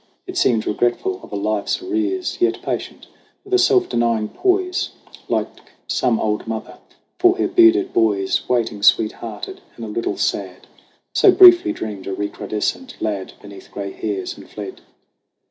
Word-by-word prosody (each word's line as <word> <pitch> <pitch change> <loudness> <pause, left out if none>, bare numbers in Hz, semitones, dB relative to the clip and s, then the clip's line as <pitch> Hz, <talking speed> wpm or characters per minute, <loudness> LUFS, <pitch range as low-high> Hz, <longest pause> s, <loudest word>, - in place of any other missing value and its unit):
It 370 - -8
seemed 115 - +2
regretful 110 -4 0
of - - -13
a - - -4
life's 105 0 -1
arrears, 360 0 -2
Yet 365 +1 +1
patient, - - -4 0.4
with 390 - -9
a 375 - +5
self 375 -1 +4
denying 115 -2 0
poise, 375 0 0 0.4
Like - - -2 0.3
some 115 -3 +1
old 105 0 -1
mother 110 -1 -6 0.4
for 365 +1 +4
her - - +1
bearded 360 +1 +4
boys 100 -4 +1
Waiting 115 -4 0
sweet 110 +1 +4
hearted 110 -3 -8
and 115 - -7
a - - -6
little 110 +2 -3
sad. - - -2 0.5
So 390 - +6
briefly 355 -2 +7
dreamed 105 - -6
a 95 - -3
recrudescent 105 - -4
lad 100 -3 -3
Beneath 100 -1 -12
gray 100 -1 -5
hairs, 100 -3 -4
and - - -14
fled. - - -8
115 Hz, 155 wpm, -20 LUFS, -, 0.5 s, briefly